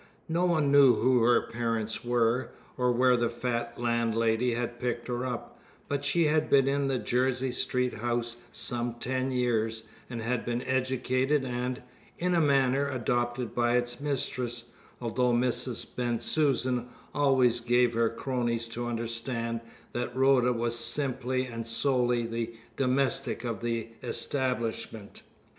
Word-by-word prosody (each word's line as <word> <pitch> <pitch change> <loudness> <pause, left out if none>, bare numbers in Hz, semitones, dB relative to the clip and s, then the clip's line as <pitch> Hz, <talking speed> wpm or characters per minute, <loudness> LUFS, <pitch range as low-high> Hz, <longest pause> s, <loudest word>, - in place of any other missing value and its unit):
No 170 +2 +1
one 155 -5 +2
knew 140 -4 +7
who 125 +2 +3
her 120 +1 +4
parents 115 -2 -2
were, 120 0 +1 0.3
or 125 -1 +2
where 125 +1 +4
the 120 -1 +1
fat 120 0 -3
landlady 115 0 +1
had 120 0 -3
picked 120 -1 -2
her 125 +1 -2
up; 125 -2 -6 0.3
but 140 0 -2
she 160 +4 +2
had 155 0 +2
been 135 -1 +5
in 140 0 +1
the 135 -1 +1
Jersey 125 +1 0
Street 125 0 0
house 120 +1 -2
some 120 -1 0
ten 130 +2 -2
years, 115 -3 0 0.3
and 120 -2 -5
had 120 +1 -1
been 120 +1 -2
educated 130 +2 0
and 125 +1 -3 0.3
in 180 +1 0
a 170 - +3
manner 140 -1 +3
adopted 120 -1 -1
by 120 0 +2
its 120 +1 -2
mistress, 125 -4 -2 0.4
although 125 +1 +1
Mrs. 125 0 0
Bensusan 125 0 +1 0.2
always 130 -4 +3
gave 120 0 +2
her 115 0 +2
cronies 120 -1 -2
to 120 +1 -4
understand 115 0 -3 0.3
that 120 0 -3
Rhoda 130 -2 +4
was 120 0 0
simply 130 +1 +1
and 115 -2 -6
solely 120 0 +1
the 115 0 -4 0.2
domestic 130 -1 0
of 115 -4 -3
the 115 -1 -2
establishment. 115 -5 -3
125 Hz, 140 wpm, -29 LUFS, 115-130 Hz, 0.4 s, knew